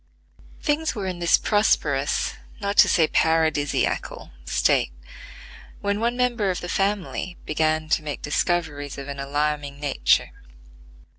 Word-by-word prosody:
Things 310 0 0
were 205 -3 -4
in 180 -2 -4
this 170 -1 +4
prosperous, 145 -10 +1 0.3
not 200 0 -2
to - - +7
say 165 -4 +4
paradisiacal, 160 -3 0
state, 60 - +2 0.9
when 200 0 -1
one 235 +2 0
member 240 -5 +1
of 180 - -1
the 175 - -6
family 195 -2 -1
began 155 0 0
to 160 - +2
make 150 -2 -6
discoveries 145 -2 -1
of 140 0 -7
an 140 -1 -6
alarming 145 0 -2
nature. 145 -2 +2
160 Hz, 130 wpm, -24 LUFS, 145-200 Hz, 0.9 s, to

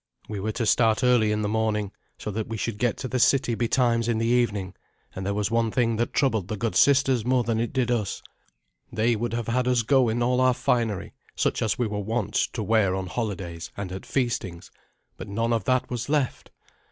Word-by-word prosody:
We 105 -2 -5
were 110 +3 -2
to 115 - -2
start 110 +1 +3
early 120 -4 +4
in 105 0 -1
the - - 0
morning, 105 -2 0 0.3
so 105 - -5
that 110 +1 -3
we 115 - -4
should 110 0 -3
get 120 -1 +1
to 130 - -4
the 130 +1 -2
city 135 -1 +3
betimes 115 0 +1
in 115 -2 +1
the 115 - 0
evening; 110 -6 +1 0.4
and 95 - -5
there 100 +1 -1
was 105 +1 -1
one 115 -1 +2
thing 115 -1 +1
that 120 - -1
troubled 110 -9 +1
the 105 - -4
good 115 +2 -2
sisters 135 -4 +4
more 125 +1 +2
than 115 -1 -1
it 115 - -1
did 130 -3 0
us. 110 -5 -2 0.7
They 115 +1 +1
would 115 +2 -3
have 115 -1 -2
had 125 +2 0
us 125 -2 +2
go 130 0 +3
in 120 +2 0
all 125 +1 +2
our 130 -1 +4
finery, 115 -7 -1 0.2
such - - 0
as 110 -4 0
we 125 - 0
were 105 -1 -3
wont 105 0 -2 0.2
to 110 - -3
wear 105 -3 +2
on 95 -1 -3
holidays 90 -5 -4
and 100 -2 -5
at 95 0 -7
feastings; 120 -10 -2 0.5
but - - -8
none 115 +4 -1
of 110 -5 -1
that 130 0 +1
was 120 +1 -3
left. 145 -4 -1
115 Hz, 225 wpm, -25 LUFS, 105-120 Hz, 0.7 s, early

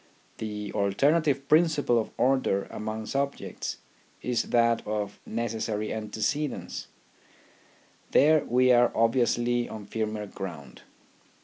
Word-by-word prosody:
The 105 -1 -5
alternative 140 +7 +2
principle 155 -6 +3
of 110 - -3
order 130 -6 +2
among 110 +1 -4
sub 140 +4 -1
jects - - -5 0.5
is 125 -2 +1
that 115 -1 +3
of 105 -1 -3
necessary 110 -2 -2
antecedence. 110 +7 -3 1.2
There 155 +1 +5
we 125 +1 +3
are 120 0 +5
obviously 120 +1 +2
on 105 -2 -7
firmer 110 0 -3
ground. 85 -10 -8
115 Hz, 105 wpm, -27 LUFS, 105-130 Hz, 1.2 s, There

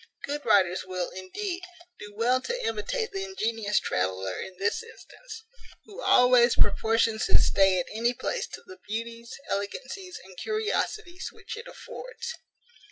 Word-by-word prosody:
Good 290 +1 -3
writers 185 -2 +4
will, 185 -1 -3
indeed, 350 - -4 0.4
do 205 - -8
well 250 +3 +3
to 485 - -3
imitate 225 - -1
the 390 -1 -3
ingenious 225 - 0
traveller 95 0 -1
in 185 -1 -8
this 200 +2 +1
instance, 455 0 -11 0.4
who 435 +3 -9
always 250 -1 +6
proportions 225 0 +3
his - - +6
stay 190 -1 +5
at 175 - -1
any 235 +3 +1
place - - -2
to - - -9
the 370 0 -12
beauties, 230 +2 -4 0.2
elegancies, 270 - -4
and 190 0 -14
curiosities 430 -4 -1
which - - -8
it 465 +2 -8
affords. 475 -2 -7
235 Hz, 145 wpm, -28 LUFS, -, 0.4 s, always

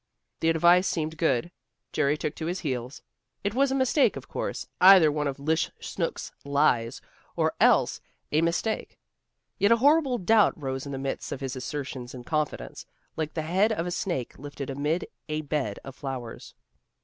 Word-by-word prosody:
The 165 - +2
advice 175 +3 +5
seemed 160 -1 -2
good. 165 0 +1 0.4
Jerry 145 +1 +2
took 150 - -3
to 160 - -4
his 180 +2 -3
heels. 130 -4 -4 0.4
It 200 0 -1
was 270 +2 +2
a - - +1
mistake, 265 +2 +3
of - - -8
course, - - -4 0.2
either 185 -4 +8
one 150 0 -1
of 140 -1 -3
'Lish 160 +3 0
Snooks' - - -4
lies, 140 -5 +1 0.3
or - - +1
else - - +4 0.3
a 155 - +3
mistake. 170 +7 -1 0.6
Yet 200 - +4
a 230 - +6
horrible 280 0 +4
doubt 215 -2 +3
rose 135 -1 -4
in - - -6
the 135 - -3
midst 135 0 -4
of 135 - -4
his 135 0 -4
assertions 130 -1 -5
of 120 -1 -9
confidence, 150 - -3 0.3
like 155 -1 -3
the 160 - -1
head 190 +7 +2
of 170 -6 -1
a 180 - -3
snake 170 -11 -3
lifted 140 -1 -6
amid 150 +6 -1 0.2
a 155 0 -1
bed 145 -8 -2
of 135 -1 -9
flowers. 130 -5 -7
155 Hz, 175 wpm, -27 LUFS, 135-180 Hz, 0.6 s, either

